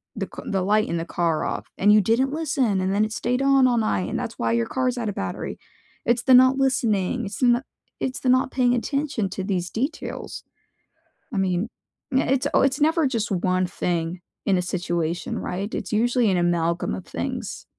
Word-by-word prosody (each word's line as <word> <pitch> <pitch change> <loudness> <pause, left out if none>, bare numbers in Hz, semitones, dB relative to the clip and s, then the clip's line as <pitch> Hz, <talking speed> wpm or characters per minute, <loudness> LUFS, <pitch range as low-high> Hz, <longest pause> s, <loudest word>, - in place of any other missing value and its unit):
the - - -3
c - - -7
the 195 -1 0
light 210 +3 +2
in 170 - -1
the 165 - -2
car 170 -2 0
off," - - -4
and 205 +2 +5
you 215 - +7
didn't 235 +7 +2
listen, 280 -10 0
and 190 +1 0
then 210 - +3
it 215 - -6
stayed 250 +3 -1
on 275 -1 +5
all 245 -1 +2
night, 215 -4 0
and 235 - -2
that's 235 -3 -5
why 115 -1 +1
your 115 0 +1
car's 255 -1 -1
out 225 - -2
of 205 - -5
battery. 95 -1 -4 0.5
It's 235 0 +2
the 260 - +5
not 260 +1 +6
listening. 240 -4 +1
It's 200 0 -6
the 255 - +3
n 240 +1 +3 0.4
it's 260 0 -2
the 255 - 0
not 255 0 +3
paying 250 -2 +2
attention 270 -4 -1
to 190 - -4
these 180 -2 -2
details. 275 +9 -4 0.9
I 205 - -2
mean, 190 +2 0 0.5
eh - - +2
it's 260 - -1
it's 275 +1 +3
never 320 0 +3
just 230 -5 -1
one 185 0 +1
thing 175 0 -2 0.2
in 195 -2 +3
a 180 - +1
situation, 175 -2 -2
right? 195 +4 -4
It's 190 - -4
usually 235 0 +2
an 185 - +1
amalgam 170 - 0
of 95 - -7
things. - - -5
215 Hz, 205 wpm, -24 LUFS, 180-255 Hz, 0.9 s, you